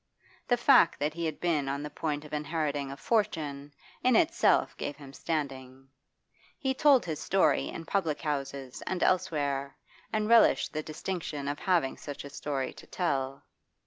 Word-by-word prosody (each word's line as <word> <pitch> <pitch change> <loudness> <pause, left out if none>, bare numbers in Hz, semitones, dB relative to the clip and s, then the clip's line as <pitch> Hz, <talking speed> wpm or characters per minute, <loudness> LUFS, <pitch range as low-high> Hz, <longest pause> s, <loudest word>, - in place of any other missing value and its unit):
The 245 - +3
fact 240 -7 +5
that 150 +1 0
he 170 +1 -3
had 155 - -5
been 155 -6 0
on 140 +1 -2
the 150 - -6
point 150 -1 -3
of 150 - -12
inheriting 150 -2 -2
a 140 - -7
fortune 145 -6 -1 0.3
in 255 -1 +4
itself 335 +4 +3
gave 145 - -4
him 140 -2 -12
standing; 135 -4 -4 0.7
he 265 -3 0
told 275 -1 +5
his 160 -3 -3
story 195 0 +2
in 165 - -7
public 165 -5 0
houses 140 -3 -4
and 185 -1 -1
elsewhere, 140 -6 0 0.3
and 215 -1 0
relished 230 0 +5
the 155 - -1
distinction 155 -2 -4
of 145 +1 -2
having 175 -8 +1
such 145 -1 -7
a 140 - -9
story 140 -1 -3
to - - -14
tell. 135 -6 -2
150 Hz, 165 wpm, -29 LUFS, 140-180 Hz, 0.7 s, fact